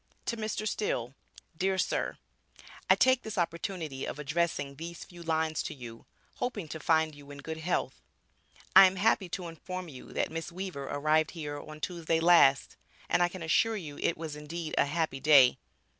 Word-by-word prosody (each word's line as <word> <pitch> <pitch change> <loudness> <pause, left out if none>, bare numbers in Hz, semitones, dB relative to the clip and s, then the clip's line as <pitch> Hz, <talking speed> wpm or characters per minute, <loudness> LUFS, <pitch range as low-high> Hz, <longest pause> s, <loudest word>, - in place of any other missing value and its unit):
To 235 - -1
Mr. 215 -1 -3
Still, 125 - -2 0.4
Dear 190 +3 0
Sir: - - -1 0.7
I - - +8
take 260 -1 +4
this 220 - -7
opportunity 165 -4 -2
of - - -5
addressing 150 -1 -1
these 170 +2 -7
few 175 -1 -13
lines 160 -1 0
to - - -5
you 120 -3 -10 0.3
hoping 225 -9 -3
to 160 - -6
find 160 0 +2
you 145 -1 -14
in 145 - -9
good 160 +3 -6
health 175 +3 -2 0.7
I 195 - +11
am 185 - -2
happy 195 -1 +2
to 180 0 -4
inform 180 +2 -7
you 130 -4 -11
that - - -1
Miss 165 +1 -5
Weaver 180 -6 -5
arrived 155 +1 +2
here 145 -2 -4
on 155 +1 -10
Tuesday 165 -2 -1
last, 165 -5 +5 0.3
and - - +3
I 175 - +4
can 180 -1 -8
assure 220 +8 +2
you 150 -7 -8
it 170 - 0
was 155 -2 -5
indeed 155 +2 -6
a - - +4
happy 155 -2 -1
day. 135 -4 +6
165 Hz, 180 wpm, -30 LUFS, 150-180 Hz, 0.7 s, I